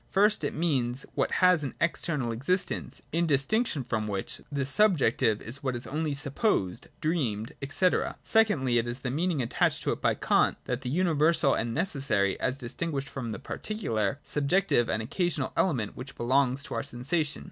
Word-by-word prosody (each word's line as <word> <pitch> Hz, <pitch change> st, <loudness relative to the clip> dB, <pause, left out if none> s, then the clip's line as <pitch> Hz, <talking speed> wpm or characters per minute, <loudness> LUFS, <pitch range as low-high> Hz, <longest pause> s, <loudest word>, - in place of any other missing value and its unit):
First, 210 Hz, +2 st, +3 dB
it -, -, -2 dB
means 135 Hz, -6 st, 0 dB
what -, -, +1 dB, 0.2 s
has 180 Hz, -4 st, +5 dB, 0.2 s
external 150 Hz, -6 st, 0 dB
existence, 140 Hz, -, -1 dB
in 170 Hz, +1 st, +1 dB
distinction 150 Hz, -, +1 dB
from 110 Hz, -3 st, -2 dB
which 100 Hz, -2 st, -4 dB
the 140 Hz, -2 st, -1 dB
subjective 145 Hz, -, +2 dB
is 125 Hz, +5 st, -6 dB
what 130 Hz, -3 st, -1 dB
is 120 Hz, -, -5 dB
only 150 Hz, 0 st, -2 dB
supposed, 140 Hz, -, -1 dB
dreamed, 120 Hz, -10 st, -1 dB, 0.2 s
&c. 185 Hz, +5 st, +3 dB, 0.4 s
Secondly, 160 Hz, -, +3 dB
it 115 Hz, -, -2 dB
has 120 Hz, +1 st, -3 dB
the 125 Hz, -, -2 dB
mean 165 Hz, +7 st, 0 dB
ing, 145 Hz, -, -1 dB
attached 115 Hz, -, +1 dB
to -, -, +1 dB
it -, -, -4 dB
by -, -, +2 dB
Kant, -, -, +2 dB
of 125 Hz, 0 st, -2 dB
the 125 Hz, -, -4 dB
universal 160 Hz, -2 st, +3 dB
and 115 Hz, 0 st, -1 dB
necessary, 135 Hz, -, +1 dB
as 130 Hz, +1 st, -1 dB
distinguished 135 Hz, +2 st, -4 dB
from 120 Hz, -4 st, -5 dB
the -, -, -4 dB
particular, 115 Hz, -, -2 dB
subjective 145 Hz, -4 st, +1 dB
and 110 Hz, -, 0 dB
occasional 155 Hz, -, -1 dB
element 125 Hz, -, 0 dB
which 135 Hz, +2 st, -8 dB
belongs 130 Hz, +2 st, +1 dB
to -, -, -7 dB
our -, -, -1 dB
sensations. 145 Hz, +4 st, -2 dB
140 Hz, 170 wpm, -28 LUFS, 120-170 Hz, 0.4 s, has